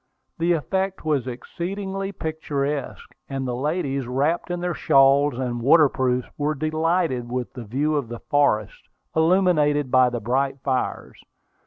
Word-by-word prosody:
The 170 +1 +3
effect 190 +3 -2
was 145 -5 0
exceedingly 195 +9 -4
picturesque; 150 -4 -4 0.2
and 135 -1 -3
the 125 - -2
ladies, 140 -2 -2
wrapped 145 +9 0
in 175 0 -2
their 175 0 -2
shawls 140 -3 +4
and 125 -2 -3
water 150 +3 +6
proofs, 125 -2 0
were 150 +1 0
delighted 155 -4 0
with 125 -1 -3
the 125 -3 -8
view 145 +8 0
of 140 -5 -1
the 120 +1 -6
forest, 110 -8 0 0.3
illuminated 160 -5 +3
by 130 -1 +5
the 120 -1 -3
bright 135 +5 -1
fires. 130 -2 -2
145 Hz, 145 wpm, -23 LUFS, 130-165 Hz, 0.3 s, water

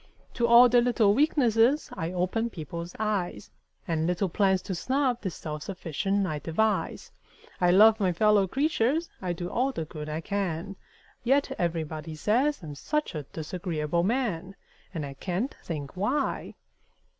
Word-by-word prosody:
To 235 - +1
all 235 +1 +8
their 245 0 +4
little 235 -4 +3
weaknesses 265 -1 +3
I 165 +1 -3
open 185 +6 -1
people's 170 -1 -7
eyes 200 - -2 0.4
And 160 -1 0
little 180 +2 0
plans 190 0 +2
to 195 - -4
snub 255 +5 0
the 190 - -2
self 155 -3 -6
sufficient 195 +3 -2
I 155 -5 -3
devise; 210 +8 -1 0.5
I 180 - +3
love 215 +4 +7
my 190 -3 +2
fellow 205 +2 +3
creatures 290 - 0
I 180 -2 -2
do 175 +1 -5
all 260 +8 0
the 165 -11 -4
good 150 -1 -7
I 155 +2 -3
can 195 -1 -3 0.5
Yet 275 +3 +2
everybody 160 -2 -3
say 235 - +2
I'm 150 -2 -7
such 300 - -2
a 150 -4 -5
disagreeable 165 0 -2
man! 195 -4 -1 0.4
And 160 -5 -4
I 140 - -7
can't 185 - -3
think 150 -3 -6
why! 255 +10 -1
190 Hz, 155 wpm, -27 LUFS, 165-235 Hz, 0.5 s, all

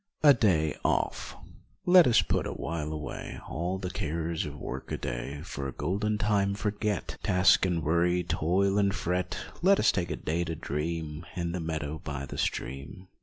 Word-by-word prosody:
50 150 - +8
A - - +10
DAY 85 - +2
OFF - - 0 0.5
Let 180 -3 +8
us 115 -2 +5
put - - 0
awhile 75 +1 -3
away 75 -1 -6
All 90 +4 -2
the 90 -1 -4
cares 80 -2 -2
of 75 0 -7
work 65 -1 -6
a - - -1
day, - - -4
For 70 -6 -5
a - - -4
golden 105 +3 -1
time 100 -2 +1
forget, 105 -2 -2
Task 90 +1 +4
and 85 -3 -1
worry, 85 +3 +2
toil 95 +6 +1
and 100 -1 +2
fret, 90 +1 -1 0.2
Let 195 +3 +5
us - - +5
take 90 -2 -2
a 80 - -1
day 80 +4 -1
to 80 -1 -3
dream 75 +1 -3
In 85 -1 -2
the 90 - -3
meadow 80 -2 -3
by 70 -2 -4
the - - -7
stream. 70 +9 -3
85 Hz, 180 wpm, -29 LUFS, 75-100 Hz, 0.5 s, A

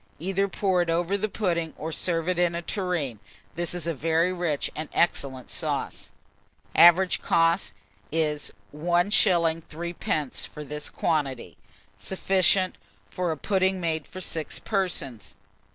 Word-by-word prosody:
Either 195 +4 0
pour 190 -2 +1
it 175 - -1
over 175 +3 +1
the 210 +2 -1
pudding, 170 -6 -1
or 160 +1 -4
serve 165 +1 -1
in 175 -1 +1
a 170 - -2
tureen. 170 - -2 0.3
This 175 0 -2
is 175 -3 -3
a 170 - 0
very 165 +4 +1
rich 170 -5 -1
and 155 -1 -5
excellent 135 -6 0
sauce. - - -3 0.7
Average 175 +2 +6
cost, 165 +2 +2 0.4
1s. 150 -2 0 0.2
3d. 170 -3 +1
for 150 - -9
this 150 +1 -5
quantity. 140 -6 -1 0.4
Sufficient 190 0 +2 0.3
for 180 -2 -1
a 160 - -3
pudding 190 +1 +1
made 160 -3 -2
for 185 +1 -8
6 160 -3 -4
persons. 175 - -2
170 Hz, 130 wpm, -26 LUFS, 155-185 Hz, 0.7 s, Average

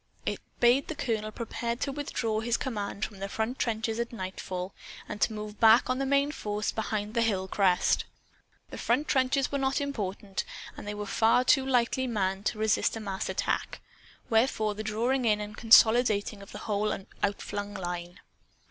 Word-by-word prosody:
It - - -1 0.2
bade 245 +3 +4
the 315 - -4
colonel 220 -5 -2
prepare 235 +1 -3
to 275 +3 -2
withdraw 245 -6 -2
his 230 +1 0
command 210 -4 -3
from 205 -3 -10
the 195 0 -4
front 225 +5 -2
trenches 225 -1 -1
at 235 - -2
nightfall, 185 -3 -5 0.3
and 210 - -6
to - - +3
move 210 -1 -7
back 225 +3 +6
on 255 - -1
the 275 - 0
main 280 +1 +3
force 210 -6 -2
behind 215 -1 -3
the 235 - +2
hill 195 -5 +1
crest. 190 -2 +2 0.7
The - - -7
front 300 - +1
trenches 265 0 +2
were 280 - 0
not 270 +1 +1
important; 205 -8 -3 0.3
and - - -9
they 210 - -3
were 210 0 -4
far 225 +4 +3
too 270 +1 +4
lightly 255 0 +2
manned 195 -3 -1
to - - -1
resist 220 +1 +2
a - - -4
mass 195 -3 -4
attack. - - -1 0.5
Wherefore 220 -2 +2
the 210 - -5
drawing 235 +5 0
in 210 -2 +3
and 210 0 -6
consolidating 220 -2 +5
of 200 - -12
the - - -7
whole 210 0 0 0.2
outflung 205 0 -2
line. 175 -1 -5
220 Hz, 180 wpm, -29 LUFS, 205-245 Hz, 0.7 s, back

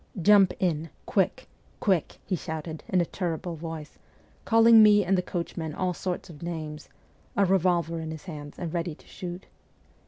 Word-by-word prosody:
' 190 - -5
Jump 200 -3 +7
in, 165 -3 0 0.2
quick, - - 0 0.3
quick! 185 -7 +1
' - - -35
he 190 - 0
shouted 160 -1 -6
in 185 - +3
a - - +1
terrible 170 -1 -3
voice, 160 -1 -7 0.5
calling 225 0 +7
me 210 -2 +6
and 195 +2 +3
the 180 - +2
coachman 170 -3 -4
all 185 -1 0
sorts 180 +1 -4
of 155 -4 -12
names, 155 -3 -6 0.5
a 200 - +5
revolver 175 -3 +2
in 160 -1 -5
his 160 -1 -7
hand 150 -5 -8
and 170 -3 -4
ready 170 -2 -2
to - - -21
shoot. 180 0 -7
175 Hz, 180 wpm, -27 LUFS, 160-185 Hz, 0.5 s, Jump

